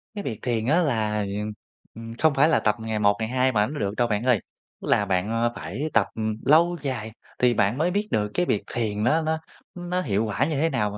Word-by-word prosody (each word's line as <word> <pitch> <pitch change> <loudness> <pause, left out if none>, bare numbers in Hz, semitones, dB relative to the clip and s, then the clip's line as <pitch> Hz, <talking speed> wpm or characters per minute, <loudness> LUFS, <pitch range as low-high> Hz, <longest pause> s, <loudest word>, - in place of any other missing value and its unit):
Cái 205 - -4
việc 110 - -4
thiền 115 -3 -1
á, 155 +7 +3
ừm, 175 - +3
là, 105 -4 0 0.7
ừm, 115 0 -8
không 160 -2 +3
phải 150 +4 +4
là - - +3
tập 105 -1 +1
ngày 110 -1 -3
một 100 -1 +4
ngày 110 0 -2
hai 130 +1 +2
mà 105 -2 +2
nó 150 +2 -6
được 100 0 -2
đâu 120 - +2
bạn 105 +1 -1
ơi, 125 -5 +3 0.4
tức - - -7
là 105 - +3
bạn, 95 +2 0
à, 115 +1 +1
phải 140 +11 -4
tập 110 -4 +3 0.4
lâu 170 +4 +4
dài 120 -6 -4 0.3
thì 125 -1 +4
bạn 105 +3 +1
mới 170 +4 +1
biết 205 +2 -1
được 105 -1 0
cái 180 - +1
việc 105 - 0
thiền 105 -3 -1
nó 155 +7 +3
nó 160 0 -1 0.4
nó 175 +1 -2
hiệu 110 - 0
quả 110 +6 0
như 155 -1 -2
thế 165 +1 +2
nào 105 -7 0
mà. 105 - -7
120 Hz, 250 wpm, -25 LUFS, 105-155 Hz, 0.7 s, phải